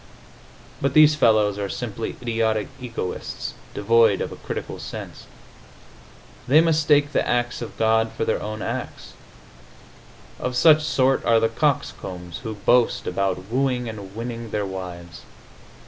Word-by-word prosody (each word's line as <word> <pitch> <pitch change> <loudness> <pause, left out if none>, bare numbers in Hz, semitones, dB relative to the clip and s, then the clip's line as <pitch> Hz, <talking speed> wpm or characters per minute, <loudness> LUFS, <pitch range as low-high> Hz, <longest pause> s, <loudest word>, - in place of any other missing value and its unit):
But 140 0 0
these 155 0 +8
fellows 110 -7 +3
are 100 -1 -2
simply 115 +1 -4
idiotic 110 -2 0
egoists, 115 -7 -5 0.2
devoid 110 -1 +4
of - - -3
a - - -7
critical - - -6
sense. - - -8 1.2
They 145 +5 +6
mistake 150 -3 +3
the - - 0
acts 120 0 0
of 120 - -7
God 110 0 +2
for - - -3
their - - 0
own 110 0 -5
acts. - - -5 1.3
Of 125 0 -3
such 155 +4 +6
sort 135 -3 +2
are 115 -1 +4
the 115 0 +2
coxcombs 95 - -2
who 110 -3 -6
boast 120 +4 +2
about 95 +1 -2
wooing 125 -1 0
and 100 -3 -8
winning 115 0 -5
their 105 -1 -2
wives. 90 -3 -7
115 Hz, 135 wpm, -23 LUFS, 105-125 Hz, 1.3 s, these